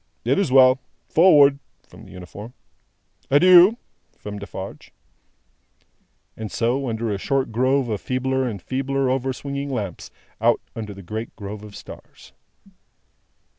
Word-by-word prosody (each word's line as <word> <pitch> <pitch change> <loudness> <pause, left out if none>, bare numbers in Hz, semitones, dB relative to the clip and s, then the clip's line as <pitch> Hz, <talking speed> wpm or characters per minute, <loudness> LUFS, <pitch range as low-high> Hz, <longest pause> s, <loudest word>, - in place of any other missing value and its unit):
"It - - +2
is 195 -9 0
well. 130 0 +6 0.3
Forward!" 145 -5 +6 0.3
from - - -15
the - - -15
uniform. 100 +6 -10 0.7
"Adieu!" 180 - +7 0.4
from 105 0 -7
Defarge. - - -9 1.4
And 110 -2 -7
so, 125 +3 -1
under 110 0 -2
a 100 - -3
short 135 +3 -1
grove 130 +3 +1
of 105 -3 -3
feebler 130 0 -1
and 105 -5 -5
feebler 135 +5 -1
over 130 0 -1
swinging 140 +2 -5
lamps, 105 -9 -5 0.3
out - - +3 0.2
under 105 -3 -6
the 100 - -11
great 110 +6 -6
grove 105 0 -8
of 105 -1 -12
stars. - - -13
130 Hz, 135 wpm, -22 LUFS, 105-135 Hz, 1.4 s, Adieu